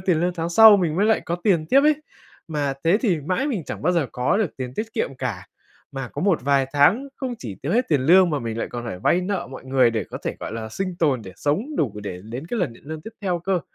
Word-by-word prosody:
tiền 180 -3 +1
lương 175 0 0
tháng 165 -1 -2
sau 220 +3 +9
mình 170 -4 0
mới 205 +3 +3
lại 220 - +3
có 170 - -3
tiền 170 -7 +2
tiếp 275 +8 +5
ấy, 300 +1 +4 0.5
mà 145 -3 -1
thế 180 +6 +4
thì 180 - +1
mãi 185 - -1
mình 210 - -2
chẳng - - -6
bao 180 +4 +2
giờ 165 -6 +1
có 125 +10 +1
được 210 -7 -1
tiền 130 -1 -5
tiết 225 +1 -4
kiệm 135 - -2
cả. 125 -8 -4 0.5
Mà 135 -3 -5
có - - -5
một 185 -9 +2
vài 140 -1 +2
tháng 195 - +3
không 255 -3 -4
chỉ 110 -6 -6
tiêu 150 +7 -1
hết 245 +3 +1
tiền 150 -4 +2
lương 175 +6 +5
mà 145 - 0
mình 115 -2 -4
lại - - -1
còn 120 -1 -6
phải 90 - -5
vay 175 - +2
nợ 195 +1 -2
mọi 130 - -9
người 130 -2 +3
để 110 -1 -2
có - - -8
thể, - - -3
gọi - - -5
là, 110 -1 -5
sinh 185 - -4
tồn 140 -9 +1
để 95 - -10
sống 210 - -1
đủ 125 -9 0
để 90 -3 -6
đến 120 +7 -7
cái 235 +6 -3
lần 160 -11 -1
nhận - - -18
lương 155 0 -6
tiếp 225 - -8
theo 180 -3 -1
cơ, 180 0 -1
160 Hz, 280 wpm, -23 LUFS, 130-195 Hz, 0.5 s, sau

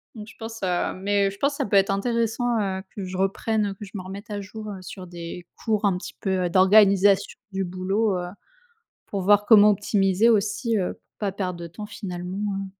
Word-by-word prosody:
Donc 215 -1 -8
je - - -15
pense, 225 0 -7
heu 180 -1 0
mais 200 +1 +1
heu, - - -2
je 200 - -12
pense 280 +1 +1
ça 280 - 0
peut 200 - 0
être 195 0 +3
intéressant, 230 +3 0
heu, 190 -2 -2
que 200 - -5
je 185 0 -6
reprenne, 205 +3 0
heu 200 - -3
que 195 - -11
je 195 - -14
me 195 - -3
remette 195 +3 -9
à 205 - -3
jour, 215 +2 -8
heu, 195 -2 -7
sur 185 0 -9
des 170 0 -8 0.2
cours 220 -2 +1
un 195 -3 +2
petit 180 - -8
peu, 190 -2 0
heu, - - 0
d'organisation 195 +1 +5
du 190 0 -2
boulot, 190 +3 0
heu, 175 - -4 0.8
pour 200 - -3
voir 205 +2 +4
comment 210 -2 +8
optimiser 200 +1 +2
aussi, 220 +1 +1
heu, 185 - -1
pour - - -30 0.2
pas 200 -2 -1
perdre 180 -3 -4
de 170 - -5
temps 195 +6 -8
finalement, 180 -2 -6 0.2
hein. 195 0 -4
195 Hz, 225 wpm, -24 LUFS, 185-210 Hz, 0.8 s, comment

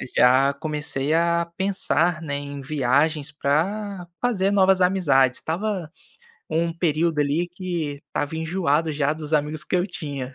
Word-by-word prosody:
já 130 +3 +5
comecei 150 -1 -2
a 170 +1 +2
pensar, 180 -4 +1
né, 145 -3 -3
em 140 0 -7
viagens 145 +2 +1
para 180 +7 -1
fazer 205 -6 +1
novas 190 -1 +4
amizades. 145 -9 +3
Estava 180 -1 -3 0.6
um 165 +1 0
período, 165 -1 +1
ali, 145 +4 +1
que 175 -5 -4
estava 145 +2 -3
enjoado 160 -2 0
já 145 0 0
dos 155 -1 -5
amigos 150 0 +1
que 185 - 0
eu 180 - +1
tinha. 140 -8 -6
160 Hz, 140 wpm, -23 LUFS, 145-180 Hz, 0.6 s, já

